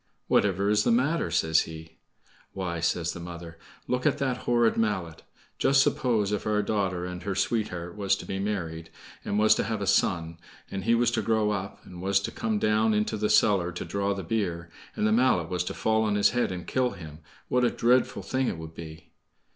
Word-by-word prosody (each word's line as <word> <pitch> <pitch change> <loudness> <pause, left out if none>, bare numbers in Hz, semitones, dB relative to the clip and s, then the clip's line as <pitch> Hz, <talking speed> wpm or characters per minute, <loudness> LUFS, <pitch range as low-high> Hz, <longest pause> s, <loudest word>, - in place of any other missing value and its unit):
"Whatever 100 0 +2
is 105 0 +3
the - - +1
matter?" 140 +8 +1
says 80 0 +3
he. 80 0 -11 0.5
"Why," 90 -3 -3
says 85 0 0
the - - -8
mother, 85 -1 -9 0.3
"look 125 0 0
at - - +1
that 135 -3 0
horrid 120 -1 +3
mallet. 95 -7 -1 0.4
Just 135 0 +4
suppose, 110 -8 +1
if 105 0 -2
our 105 -1 +1
daughter 95 -4 -1
and 90 0 -6
her 100 0 -3
sweetheart 90 -4 -2
was 100 -1 +1
to - - -9
be 95 - -4
married, 85 -6 -3 0.3
and 100 - -2
was 110 0 +6
to - - 0
have 110 -1 -2
a 100 - -2
son, 85 -4 +1 0.3
and 95 0 -4
he 115 +1 +4
was 120 0 +2
to 120 -2 0
grow 110 -1 +1
up, 100 -1 -5
and 90 -1 -10
was 95 +1 +2
to - - -4
come 110 -1 -2
down 110 +1 +2
into 105 +1 0
the 105 0 -1
cellar 90 -4 +3
to 90 - -5
draw 100 0 -1
the 95 - -5
beer, 85 -3 -2 0.2
and - - 0
the 110 - +3
mallet 110 -8 +3
was 90 -1 -1
to - - -4
fall 110 0 +1
on 105 -2 +1
his 105 - +4
head 120 -5 0
and 90 -1 -6
kill 130 -1 +1
him, 80 -3 -10 0.3
what 125 0 +1
a 120 - +4
dreadful 125 +2 +1
thing 130 -1 -1
it - - -2
would 80 0 -9
be!" 80 -1 -11
100 Hz, 215 wpm, -27 LUFS, 85-110 Hz, 0.5 s, was